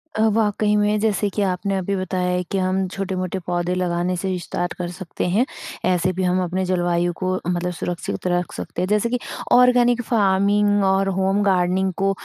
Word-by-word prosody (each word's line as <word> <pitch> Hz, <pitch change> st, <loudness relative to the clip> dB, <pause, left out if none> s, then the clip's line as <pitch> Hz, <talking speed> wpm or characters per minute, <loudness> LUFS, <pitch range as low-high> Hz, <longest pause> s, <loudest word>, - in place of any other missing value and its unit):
अ, -, -, 0 dB
वाक़ई 210 Hz, -1 st, +1 dB
में 210 Hz, 0 st, +2 dB
जैसे 210 Hz, -1 st, +1 dB
कि 210 Hz, -, 0 dB
आपने 195 Hz, 0 st, 0 dB
अभी 190 Hz, +1 st, -1 dB
बताया 185 Hz, -1 st, -2 dB
है 180 Hz, 0 st, 0 dB
कि 195 Hz, -, 0 dB
हम 185 Hz, 0 st, 0 dB
छोटे-मोटे 185 Hz, -1 st, -3 dB
पौधे 175 Hz, 0 st, -1 dB
लगाने 180 Hz, 0 st, 0 dB
से 190 Hz, +2 st, -3 dB
विस्तार 175 Hz, 0 st, -3 dB
कर 175 Hz, -, -3 dB
सकते 190 Hz, -3 st, -4 dB
हैं। 205 Hz, +8 st, +2 dB, 0.5 s
ऐसे 180 Hz, +1 st, +1 dB
भी 185 Hz, +1 st, -2 dB
हम 180 Hz, 0 st, +2 dB
अपने 185 Hz, +2 st, -1 dB
जलवायु 175 Hz, -1 st, 0 dB
को 185 Hz, 0 st, 0 dB
मतलब 180 Hz, 0 st, -1 dB
सुरक्षित 175 Hz, +1 st, -4 dB
रख 175 Hz, 0 st, -1 dB
सकते -, -, -5 dB
हैं 185 Hz, -, 0 dB
जैसे 210 Hz, +3 st, +1 dB
कि 250 Hz, +1 st, -1 dB, 0.3 s
ऑर्गैनिक 245 Hz, -1 st, +5 dB
फ़ार्मिंग 205 Hz, -1 st, +3 dB
और 195 Hz, 0 st, +2 dB
होम 195 Hz, +1 st, +2 dB
गार्डनिंग 190 Hz, 0 st, +2 dB
को 195 Hz, 0 st, +2 dB
190 Hz, 185 wpm, -21 LUFS, 180-205 Hz, 0.5 s, ऑर्गैनिक